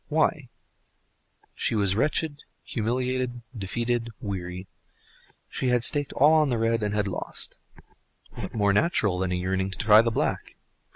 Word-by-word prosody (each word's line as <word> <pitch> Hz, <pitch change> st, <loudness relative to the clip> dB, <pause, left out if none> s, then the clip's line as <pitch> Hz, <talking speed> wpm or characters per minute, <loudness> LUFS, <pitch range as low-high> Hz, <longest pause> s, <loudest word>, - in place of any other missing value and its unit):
Why? 155 Hz, -3 st, 0 dB, 1.0 s
She -, -, -1 dB
was 100 Hz, -3 st, +2 dB
wretched, 145 Hz, +4 st, -1 dB, 0.2 s
humiliated, 125 Hz, +1 st, -2 dB
defeated, 120 Hz, +3 st, -2 dB
weary; 90 Hz, -2 st, -5 dB, 0.8 s
she 130 Hz, -, -3 dB
had 125 Hz, -1 st, +3 dB
staked 145 Hz, +2 st, +3 dB
all 150 Hz, +4 st, +5 dB
on 155 Hz, -2 st, +4 dB
the 120 Hz, -, 0 dB
red, 115 Hz, 0 st, +1 dB
and 105 Hz, 0 st, -1 dB
had 105 Hz, -1 st, 0 dB
lost—what 100 Hz, -, -7 dB
more 100 Hz, -2 st, +2 dB
natural 105 Hz, -, +1 dB
than 95 Hz, -1 st, -1 dB
a -, -, 0 dB
yearning 95 Hz, +1 st, -1 dB
to 95 Hz, -, -5 dB
try 110 Hz, -1 st, +6 dB
the 115 Hz, -, 0 dB
black? 110 Hz, -, -2 dB
115 Hz, 140 wpm, -26 LUFS, 100-130 Hz, 1.0 s, try